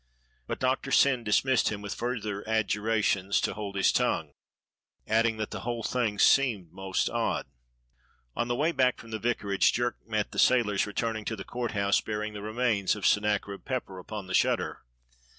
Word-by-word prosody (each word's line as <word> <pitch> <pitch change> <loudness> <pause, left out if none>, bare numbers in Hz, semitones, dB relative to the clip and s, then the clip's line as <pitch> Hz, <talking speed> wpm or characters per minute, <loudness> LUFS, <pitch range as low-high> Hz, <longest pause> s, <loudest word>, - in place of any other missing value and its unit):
But - - -4
Doctor 130 +1 0
Syn 135 -3 +4
dismissed 115 +4 +2
him 105 - -4
with 100 - -4
further 110 -4 -3
adjura 110 0 0
tions 100 0 +1
to - - -1
hold 100 -1 -6
his 95 - +3
tongue, - - 0 0.7
adding 115 +1 +2
that 110 -1 -4
the - - -4
whole 120 -1 -3
thing 115 -5 -1
seemed 105 -8 +3
most 95 -1 -1
odd. - - -1 0.9
On 120 - -1
the 120 - 0
way 155 +6 +1
back 130 -5 +2
from 115 - -12
the 110 - -3
vicarage 105 -4 +1
Jerk 120 0 -1
met 110 -2 -1
the - - -4
sailors 110 -6 +3
returning 110 +1 -2
to 110 - -2
the - - -7
Court 120 -1 -4
House 100 -1 +2
bearing 105 0 -4
the 105 - -7
re 105 +1 -5
mains 115 -6 +1
of 105 - -5
Sennacherib 105 -1 +1
Pepper 120 -8 -4
upon 105 +2 -7
the 95 - -6
shutter. - - +1
110 Hz, 185 wpm, -28 LUFS, 100-120 Hz, 0.9 s, Syn